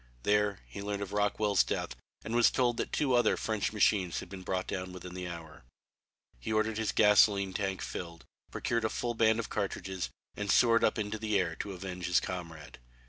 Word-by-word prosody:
There 105 -1 +2
he - - -8
learned 100 0 -3
of 100 - -7
Rockwell's 105 -1 +2
death - - -3 0.3
and 110 - -4
was 120 -1 +6
told 120 -2 +1
that - - -2
two 140 -4 +1
other 120 0 +3
French 110 -2 -1
machines 100 -4 +2
had - - -9
been 95 -1 -8
brought 95 0 -2
down 90 0 -4
within 90 0 -8
the 90 0 -5
hour. 85 -4 -9 0.8
He 60 - -5
ordered 110 0 +1
his 110 - 0
gasoline 100 -2 +4
tank 95 -1 -2
filled, 85 -2 -7 0.2
procured 115 -1 -1
a 110 - +1
full 120 +2 -2
band 110 -1 +3
of 115 - -4
cartridges 95 -2 -3 0.3
and 105 -1 -4
soared 115 0 +5
up 110 - +3
into 110 0 -3
the 105 -2 +1
air 85 -3 0
to 100 - -5
avenge 90 -1 -5
his 90 - +4
comrade. 80 -5 -7
100 Hz, 195 wpm, -31 LUFS, 90-110 Hz, 0.8 s, was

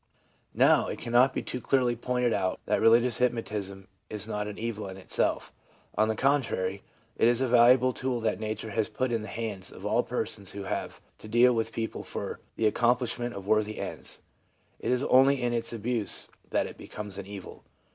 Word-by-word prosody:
Now, - - +5
it - - -4
cannot 120 +3 +3
be - - -3
too 125 - -4
clearly 125 -1 +2
pointed 125 0 0
out 95 -2 -1
that - - +1
religious 115 +1 +4
hypnosis 110 -5 -1 0.4
is 105 0 -4
not 105 -1 -3
an 105 - -7
evil 110 -3 -4
in 95 0 -8
itself; 95 - 0 0.4
on 110 +1 +3
the 110 - 0
contrary, 110 -8 0 0.4
it - - +4
is 120 0 +4
a 130 - +2
valuable 125 +1 +5
tool 130 -1 -2
that 110 - 0
nature 110 0 -4
has 110 +1 0
put 130 -1 -1
in 115 -2 0
the 105 - -7
hands 105 -3 -3
of 95 - -10
all 110 +3 +3
persons 110 -6 -4
who 100 - -6
have - - -4 0.2
to - - -11
deal 120 +3 +5
with 115 -1 -1
people 115 0 -4
for - - -5 0.2
the 110 - 0
accomplishment 120 +1 +1
of 100 -1 -7
worthy 110 0 +1
ends. - - -4 0.6
It - - -3
is 125 +1 +2
only 135 +1 +5
in 120 -1 0
its 115 -1 0
abuse 115 -2 -1 0.2
that - - +1
it - - -9
becomes 105 -2 -6
an 95 - -7
evil. 100 -2 -9
115 Hz, 195 wpm, -28 LUFS, 105-125 Hz, 0.6 s, Now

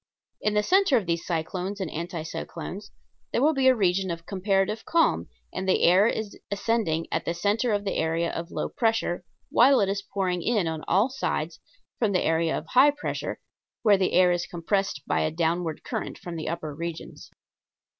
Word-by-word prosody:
In 210 0 0
the 210 - +3
center 375 - +4
of 215 - -1
these 170 0 -1
cyclones 180 +4 -3
and 185 -5 -3
anti 170 0 -4
cyclones 75 - -6 0.4
there - - +1
will 300 +5 +4
be 270 -2 +2
a 260 - +6
region 190 -2 +1
of 165 -1 -5
comparative 195 +3 0
calm, 330 -1 +2 0.2
and 190 +1 -3
the - - +3
air 185 +5 +6
is 220 -3 -3
ascending 200 -6 0
at - - 0
the 170 - -1
center 210 +6 +1
of 205 -1 0
the 195 - -1
area 165 +1 0
of 170 +1 -5
low - - -2
pressure 225 -7 0 0.3
while 265 +3 +6
it 195 - +2
is 195 0 -1
pouring 185 -3 -2
in 210 -3 +1
on 160 -1 -3
all 200 +8 +3
sides 165 -11 -2 0.4
from 215 -4 +1
the 180 - +2
area 165 0 +1
of - - -6
high 265 +3 +6
pressure 290 0 -4 0.4
where 210 -3 +6
the 185 - +1
air 180 -1 +5
is 175 -1 -1
compressed 175 -3 -1
by - - +1
a - - +1
downward 165 0 -1
current - - -4
from 175 -1 -7
the 160 - -4
upper 160 -3 -4
regions. 165 +2 -7
185 Hz, 195 wpm, -26 LUFS, 170-215 Hz, 0.4 s, a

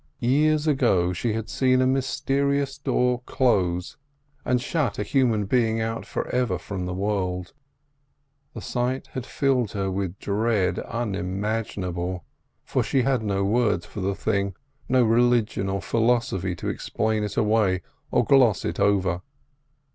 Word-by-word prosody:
Years 150 +5 +2
ago 115 - +2
she 110 +5 -1
had 110 0 -3
seen 130 -2 +2
a 130 - +3
mysterious 140 +1 0
door 125 -3 +1
close 90 -8 +1 0.5
and 125 -1 +1
shut 140 -4 -1
a - - -1
human 115 -3 +1
being 115 +1 +1
out 115 0 -3
for - - -3
ever 125 -7 0
from 90 +2 -5
the 90 - -3
world. 95 -2 -2 1.0
The - - -6
sight 125 +1 -2
had 130 -2 -5
filled 130 -7 0
her 95 -1 -1
with 95 -1 -3
dread 100 -3 0
unimaginable, 100 -4 -3 0.4
for - - 0
she 130 - +1
had 130 -3 +1
no 100 -2 -1
words 105 -4 +1
for 105 - -7
the 95 +1 -1
thing, 100 -2 -1 0.3
no 130 -1 +4
religion 115 -3 +2
or 95 0 -2
philosophy 115 -6 +1
to 85 - -6
explain 110 -1 -1
it 105 -1 -4
away 105 -5 +2 0.3
or - - +2
gloss 125 -7 +4
it - - -3
over. 95 -3 +2
110 Hz, 145 wpm, -25 LUFS, 95-125 Hz, 1.0 s, no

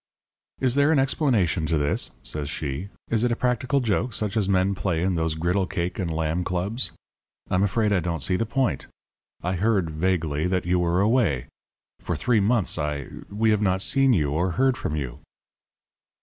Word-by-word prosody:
"'Is 130 -2 +2
there 140 +3 +3
an 160 - +4
explanation 115 - +1
to 80 - +1
this?' 75 0 0
says 75 -2 -4
she. 75 +4 -4 0.2
'Is 115 0 +2
it 120 - +2
a - - +2
practical 125 +3 0
joke 115 +1 0
such 105 0 -1
as 105 -3 +1
men 95 0 +2
play 90 -3 -1
in 95 0 +1
those 80 -2 0
Griddle 90 +4 0
cake 90 -1 -3
and 90 -3 -1
Lamb 80 +2 -1
Clubs? 95 +8 -1 0.6
I'm 95 - +2
afraid 105 +1 +2
I 95 - +3
don't 85 -3 -2
see 90 - +1
the 115 +4 -1
point. 125 - -1 0.6
I 90 - 0
heard, 95 -4 +1
vaguely, 80 -2 0
that 90 0 -1
you 90 0 +2
were 90 +1 +2
away. 100 - +2 0.5
For - - -3
three 120 -3 +2
months 105 0 +1
I 75 -2 -3 0.2
we 110 +2 +1
have 105 -1 +2
not 95 -1 +2
seen 135 +2 +3
you 75 - +2
or 85 +4 0
heard 130 +3 +2
from 75 - -3
you.' 65 -5 -4
95 Hz, 190 wpm, -25 LUFS, 80-115 Hz, 0.6 s, an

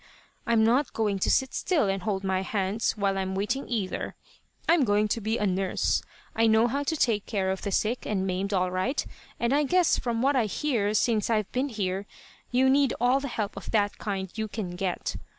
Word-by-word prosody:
I'm 230 -1 +4
not 245 +5 +2
going 210 -3 0
to - - +1
sit 265 -1 +2
still 320 - +1
and 195 0 -1
hold 195 -1 -2
my 190 -1 0
hands 195 +2 -1
while 200 -2 0
I'm 190 0 -2
waiting, 235 +8 -2
either. 210 -6 -2 0.5
I'm 330 -3 +5
going 210 -2 +2
to 230 - -1
be 220 +3 0
a 210 - 0
nurse. 190 -1 +1 0.3
I 225 0 +4
know 220 +1 +5
how 275 +4 -1
to 315 +3 -1
take 220 -7 +1
care 190 -3 0
of 190 - -3
the 200 - -3
sick 220 +6 0
and 195 -3 0
maimed 190 +2 -2
all 185 -2 +1
right, 185 +10 -1 0.3
and 235 +2 +1
I 290 - +4
guess 350 +4 +3
from 235 -1 -1
what 275 +1 +3
I 245 -4 +3
hear 215 -3 0
since 220 -2 +2
I've 215 -3 0
been 265 +3 -1
here 200 -3 -3 0.4
you 255 +2 +3
need 275 0 +3
all 250 +3 +3
the 280 - -4
help 215 -5 -3
of - - -8
that 205 -2 +1
kind 190 -3 -3
you 220 -1 -2
can 205 -4 -5
get. 180 0 -3
215 Hz, 215 wpm, -27 LUFS, 195-245 Hz, 0.5 s, I'm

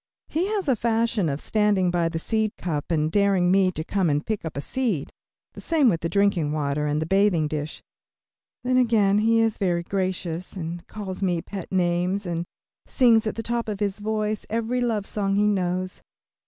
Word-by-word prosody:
He 345 +5 0
has 410 -5 -2
a 265 - +4
fashion 225 -5 +1
of 140 0 -2
standing 205 -3 +2
by 170 -1 +1
the 165 - -3
seed 220 +5 -1
cup 150 -5 -3
and 155 -2 +1
daring 195 -3 +3
me 190 -1 +4
to 155 - -3
come 185 0 0
and 145 +1 0
pick 215 -2 -2
up 160 -3 -6
a - - 0
seed; 225 - -2 0.4
the - - -10
same 310 -6 +3
with 165 -6 0
the 165 - -1
drinking 195 -7 +2
water 150 0 -1
and 150 +1 0
the 160 - -1
bathing 190 -3 +2
dish. 150 0 -5 0.8
Then 255 0 +2
again 215 -5 +3
he 225 +1 +3
is 225 -1 0
very 175 -3 +1
gracious, 185 -2 -3
and 170 -1 -6
calls 200 -3 -6
me 180 -3 +1
pet 190 +1 -7
names, 180 +2 0
and 170 -1 -2 0.4
sings 230 -4 +4
at - - -2
the 225 - -4
top 235 0 -2
of 205 -2 -4
his 205 -1 -1
voice 215 0 -2
every 230 +3 -1
love 225 -4 0
song 195 -1 -1
he 205 +1 +3
knows. 185 -2 -1
195 Hz, 195 wpm, -24 LUFS, 170-220 Hz, 0.8 s, a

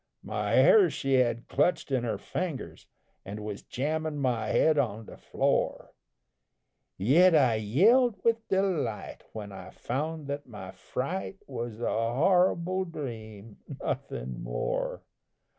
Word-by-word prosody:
My - - -2
hair 435 -6 +6
she 135 0 -2
had 120 -2 +2
clutched 145 +1 +1
in 130 -3 +1
her 110 -3 -1
fingers, 160 - -5 0.4
An' 105 +2 -7
was 105 -1 -5
jammin' 155 +3 -2
my 125 -5 0
head 155 -2 +3
on 110 -4 -1
the - - -11
floor, - - -1 1.1
Yet 160 - +5
I 130 -7 +4
yelled 205 - +4
with 230 -1 +1
delight 180 - -1
when 105 -2 -7
I 95 -1 -9
found 150 +8 -4
that 140 +1 -5
my 105 -5 -8
fright 140 - -4
Was 120 -4 -6
a 120 - -1 0.2
horrible 180 +4 +2
dream, 110 - -8 0.2
nothin' 60 0 -4
more. - - -3
135 Hz, 125 wpm, -28 LUFS, 110-170 Hz, 1.1 s, hair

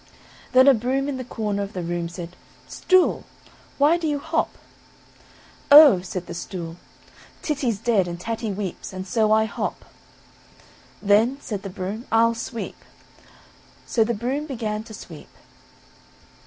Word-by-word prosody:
Then 260 +1 +7
a 275 - +9
broom 260 +4 -1
in 280 -2 -3
the 255 - -5
corner 210 -4 -3
of 200 +1 -5
the 180 - -4
room 170 0 -3
said, 175 0 -8 0.3
"Stool, 370 -1 +2 0.5
why 295 +4 +4
do 330 - -2
you 295 -1 0
hop?" 320 +3 -1 1.2
"Oh!" 285 - +9
said 180 0 -5
the 170 - -7
stool, 170 -1 -6 0.7
"Titty's 270 -8 -1
dead, 200 -4 +1
and 170 0 -6
Tatty 225 +2 -3
weeps, 195 -1 -5
and 185 0 -6
so 220 0 +1
I 220 0 +4
hop;" 220 - -4 1.2
"then," 215 +6 +3
said 205 -8 -5
the 195 - -6
broom, 195 +6 -6
"I'll 230 +1 +4
sweep," 230 0 -6 1.1
so 225 - +2
the 235 +1 -1
broom 260 +8 -3
began 220 -6 -3
to 220 - -11
sweep. 165 -7 -11
220 Hz, 145 wpm, -23 LUFS, 190-260 Hz, 1.2 s, a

